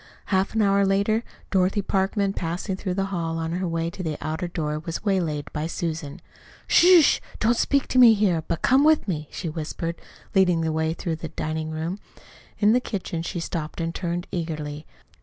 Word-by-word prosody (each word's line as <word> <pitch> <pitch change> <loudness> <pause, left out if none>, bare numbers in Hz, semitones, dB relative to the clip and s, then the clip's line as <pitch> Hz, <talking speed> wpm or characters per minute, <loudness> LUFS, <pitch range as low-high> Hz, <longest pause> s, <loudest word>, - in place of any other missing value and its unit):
Half 190 +3 +1
an 220 - +3
hour 200 0 +3
later, 200 +3 +2 0.3
Dorothy 190 +1 +2
Parkman, 195 +1 0
passing 175 +2 -3
through 185 -1 -3
the 195 0 0
hall 165 -2 -2
on 165 0 -2
her 180 +2 -1
way 165 0 -1
to 185 - -7
the 155 -4 -3
outer 160 +3 -3
door, 150 -3 -3
was 165 +5 -6
waylaid 170 -7 -1
by 155 +1 -2
Susan. 160 -4 -4 0.4
"Sh - - +5
h! 355 -4 +6 0.2
Don't 230 +2 +3
speak 280 +3 +1
here, 215 -9 +5
but 170 - -3
come 265 +2 +5
with 310 -4 +4
me," 155 -5 -3
she 175 - -5
whispered, 165 +1 -4 0.3
leading 180 -3 +4
the 160 0 0
way 160 +1 0
through 165 -2 -3
the 160 - -6
diningroom. 160 +3 -3 0.6
In 210 +1 +4
the 250 - +4
kitchen 190 -8 -4
she 170 +1 -4
stopped 165 -1 -4
and 165 0 -2
turned 175 0 -3
eagerly. 155 -3 -4
175 Hz, 180 wpm, -24 LUFS, 160-195 Hz, 0.6 s, h